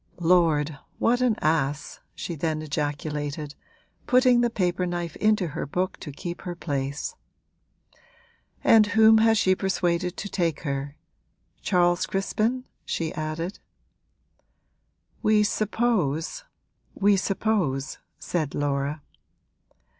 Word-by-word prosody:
'Lord, 165 -4 +2 0.2
what 245 +2 +2
an 245 -4 +3
ass!' 150 -2 0 0.2
she 175 - -5
then 155 0 -2
ejaculated, 145 0 -3 0.5
putting 250 -1 +5
the 240 - +2
paper 180 -4 0
knife 175 -2 -4
into 215 -5 +2
her 145 - -4
book 185 +6 -2
to 150 - -7
keep 170 +4 -6
her 175 -1 -5
place. 140 -3 -3 1.5
'And 220 -2 +6
whom 220 0 +7
has 225 0 +4
she 185 -2 +4
persuaded 180 -1 -1
to 200 - -4
take 170 -5 -1
her 140 -1 -3 0.7
Charles 175 -2 +2
Crispin?' 220 +6 -1 0.2
she 160 -1 -3
added. 155 +4 -4 1.6
'We 215 -1 +4
suppose 210 - 0 0.5
we 205 0 +4
suppose 190 -8 -1
' - - -50
said 155 -5 -3
Laura. 145 +1 -1
175 Hz, 110 wpm, -25 LUFS, 150-210 Hz, 1.6 s, whom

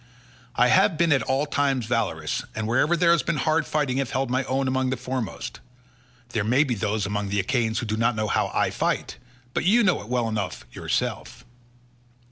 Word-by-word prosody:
I - - +4
have 165 - +4
been 170 0 +2
at 135 - +4
all 135 +2 0
times 140 -4 0
valorous, 95 -10 -1
and 110 -1 -2
wherever 145 +9 +2
there 170 0 +4
has 170 - +4
been 170 - -1
hard 155 +2 +1
fighting 145 -4 0
have 135 -3 -1
held 130 0 -1
my 130 +1 +1
own 135 +1 0
among 130 0 0
the 130 - -1
foremost. 125 -2 -5 0.7
There 110 -3 -1
may 125 +7 +3
be 135 -5 -1
those 105 -1 -1
among 100 0 -2
the 100 +1 0
Achaeans 110 +3 0
who - - -2
do 110 0 -2
not 115 +1 +2
know 110 0 -1
how - - +1
I - - 0
fight, - - -2 0.4
but - - 0
you 220 +7 +4
know 195 -4 +2
it 105 - -11
well 125 -2 0
enough 105 -5 -3
yourself." - - -3
125 Hz, 205 wpm, -25 LUFS, 110-145 Hz, 0.7 s, I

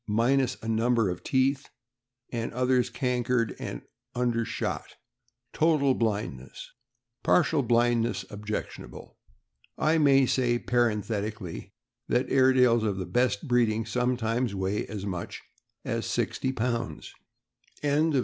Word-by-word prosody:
e., 115 - -8
minus 125 +3 +2
a - - -5
number 115 -1 +2
of 90 - -7
teeth, 135 +1 +1 0.6
and 115 -1 -3
others 125 0 +2
cankered; 125 -2 0
also - - -5 0.3
undershot; 120 -2 -2 0.6
total 150 -4 +3
blindness 100 - -3 0.5
(partial 160 -3 +3
blindness 120 -4 +1
objectionable). 105 +1 -6 0.6
I 160 +1 +2
may 135 -3 +5
say, 120 -1 +1
parenthetically, 110 -5 -2 0.3
that 125 +2 0
Airedales 130 -3 +4
of 105 -3 -1
the 95 - -3
best 110 +3 0
breeding 115 -3 +2
sometimes 125 -2 0
weigh 95 +2 -2
as 100 -2 -6
much 90 -4 -5 0.5
as - - -2
sixty 130 - -1
pounds. 120 -2 -3
120 Hz, 110 wpm, -27 LUFS, 110-125 Hz, 0.6 s, may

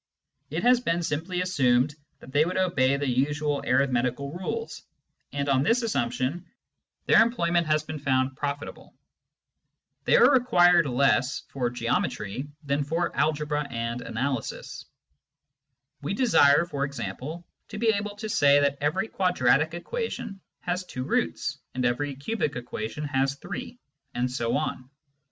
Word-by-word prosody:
It - - -3
has 245 0 +5
been 175 -8 -1
simply 170 +4 -2
assumed 135 -6 +2 0.3
that 130 - -12
they 145 +3 +4
would 180 +3 -2
obey 140 -8 +2
the 140 0 -2
usual 145 +3 0
arithmetical 130 +1 +1
rules, 190 - -4 0.5
and 140 0 -2
on 135 -2 +3
this 235 - +2
assumption 130 - -1 0.6
their - - +6
employ 225 -7 +1
ment 170 -2 +2
has 155 0 +2
been 155 0 -6
found 130 -1 +1
profitable. 145 +1 -5 1.1
They - - +4
are - - +7
required 175 - +5
less 135 +1 +2
for 125 -3 -1
geometry 120 0 -2 0.2
than 140 0 0
for 165 +4 -2
algebra 150 -1 0
and 115 +1 -3
analysis. 130 +1 -4 1.2
We 150 +8 -2
desire, 170 - +5
for 145 -5 -3
example, 140 - -5 0.2
to 210 - -8
be 225 +1 +2
able 205 -1 -1
to 220 +1 -6
say 145 -8 +4
that 140 -1 +1
every 170 +9 0
quadratic 160 - +2
equation 200 - -5 0.2
has 180 +1 -2
two 125 -8 -6
roots, - - -1 0.2
and 125 -1 0
every 140 +4 0
cubic 145 +2 -2
equation 120 +2 -5
has 135 -1 0
three, 235 - -7 0.4
and 125 +1 0
so 120 0 0
on. 130 -4 -4
145 Hz, 140 wpm, -26 LUFS, 130-175 Hz, 1.2 s, are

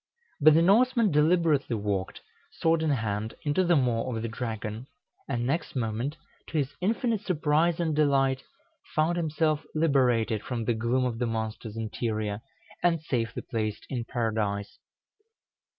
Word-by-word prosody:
But 155 0 +7
the 165 - +5
Norseman 230 +2 +4
deliberately 150 -4 +3
walked, 100 -3 -2 0.3
sword 165 0 +2
in 160 - +1
hand, 110 -4 -1
into 150 +5 +2
the 175 -1 +3
maw 125 -3 +1
of 110 - -3
the - - -1
dragon, 115 0 -5 0.4
and 120 -3 -1
next 145 +5 -2
moment, 120 +5 -2 0.3
to 160 - -3
his 140 -2 0
infinite 225 +2 0
surprise 160 -2 +1
and 160 -3 0
delight, 135 -3 +2 0.5
found 155 +3 +2
himself 155 -2 0
liberated 125 -8 +2
from 120 -3 -4
the 120 - +2
gloom 120 +3 0
of 115 -2 -2
the 120 - 0
monster's 110 -1 -4
interior, 110 -2 -2 0.4
and 165 -3 +2
safely 120 -6 -2
placed 110 -2 -3
in 125 -3 -2
Paradise. 110 -4 -2
130 Hz, 145 wpm, -28 LUFS, 115-160 Hz, 0.5 s, But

